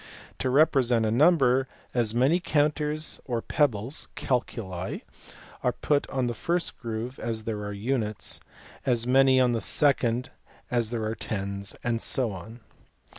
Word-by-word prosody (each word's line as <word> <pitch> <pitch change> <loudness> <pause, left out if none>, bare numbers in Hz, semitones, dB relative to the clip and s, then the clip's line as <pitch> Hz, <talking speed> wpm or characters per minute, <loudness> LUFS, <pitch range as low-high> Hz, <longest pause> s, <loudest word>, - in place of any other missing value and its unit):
To 130 - 0
re 145 +5 +6
present 120 -6 +2
a 110 - +1
number, 135 -1 +4 0.3
as 115 -3 +1
many 135 +9 +4
counters 150 -1 0
or 120 -3 -1
pebbles 125 0 0
(calculi) 95 -8 -2 0.6
are - - +2
put 145 -1 0
on 130 -2 0
the 120 - -1
first 170 +7 -1
groove 115 +2 -5
as 110 -2 -2
there 110 -1 -3
are 105 - -4
units, 105 0 -2 0.4
as 120 -3 +1
many 130 +1 +5
on 125 -1 +4
the 115 -2 0
second 125 -1 +2 0.4
as 120 -3 +1
there 115 -2 -2
are 110 - -1
tens, 100 -2 -4
and 115 -1 0
so 125 -5 0
on. 110 +6 -9
120 Hz, 150 wpm, -27 LUFS, 110-135 Hz, 0.6 s, re